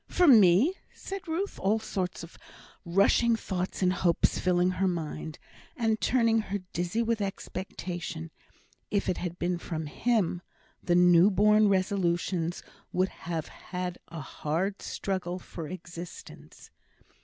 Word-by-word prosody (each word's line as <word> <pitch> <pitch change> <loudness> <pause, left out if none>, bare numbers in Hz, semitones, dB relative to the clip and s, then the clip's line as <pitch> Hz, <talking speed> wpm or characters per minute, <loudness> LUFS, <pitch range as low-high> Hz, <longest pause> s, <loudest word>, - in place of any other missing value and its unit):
"For 360 -1 +3
me!" 220 - +7 0.2
said 390 -2 -7
Ruth, 355 +5 -2
all 205 +3 +2
sorts 185 -6 -3
of 165 - -11 0.5
rushing 200 +6 +3
thoughts 185 -3 -3
and 180 0 +3
hopes 175 -2 +2
filling 180 0 +2
her 185 +1 0
mind, 160 -3 -4 0.4
and 225 -3 +1
turning 230 -3 +3
her 205 -1 -3 0.2
dizzy 175 +7 0
with 230 -1 0
expectation. 175 -4 -5 0.6
If 200 -1 0
it 180 - 0
had 175 -1 -4
been 175 0 -1
from 160 -3 -4
"him," 190 +1 0 0.4
the 175 - +1
new 180 +1 +6
born 210 +2 +5
resolutions 180 -3 0 0.3
would 185 +1 +1
have 165 -2 -5
had 180 -1 -6
a 165 -1 -7
hard 165 +8 -2
struggle 185 -2 -3
for 170 -3 -8
existence. 175 0 -10
185 Hz, 130 wpm, -29 LUFS, 175-210 Hz, 0.6 s, me